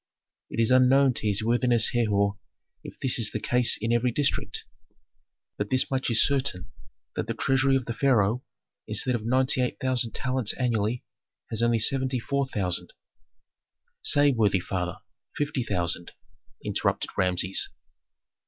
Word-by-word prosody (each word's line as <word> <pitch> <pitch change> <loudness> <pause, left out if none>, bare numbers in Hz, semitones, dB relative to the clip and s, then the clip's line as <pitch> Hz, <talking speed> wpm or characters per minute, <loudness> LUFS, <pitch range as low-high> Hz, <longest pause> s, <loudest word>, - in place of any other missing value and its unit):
"It - - -5
is 115 +1 +3
unknown 130 +1 +5
to 110 - -3
his 105 +1 +1
worthiness 120 0 +2
Herhor 100 -4 +1 0.4
if - - -11
this 130 -2 +1
is 110 -3 0
the 110 - -4
case 125 +2 +2
in 115 +2 -1
every 120 +1 +2
district. 145 +3 -1 0.9
But 105 0 -3
this 130 +1 +1
much 130 -1 0
is 115 - +4
certain, 135 -10 -2 0.4
that - - -3
the - - -3
treasury 135 0 +2
of 130 -2 0
the 115 - -3
pharaoh, 120 -2 +2 0.4
instead 125 - 0
of 115 -3 -2
ninety 130 +3 +2
eight 125 - -1
thousand 125 -3 0
talents 130 -4 -1
annually, 120 -2 0 0.5
has 110 - -1
only 120 0 +3
seventy 130 +2 0
four 140 +3 -1
thousand 95 -8 -3 0.6
" - - -65 0.3
"Say, 145 0 +4
worthy 105 -6 +2
father, 90 -1 -3 0.4
fifty 145 -3 -1
thousand," 85 -5 -2 0.5
interrupted - - -1
Rameses. 90 0 0
120 Hz, 150 wpm, -26 LUFS, 105-130 Hz, 0.9 s, unknown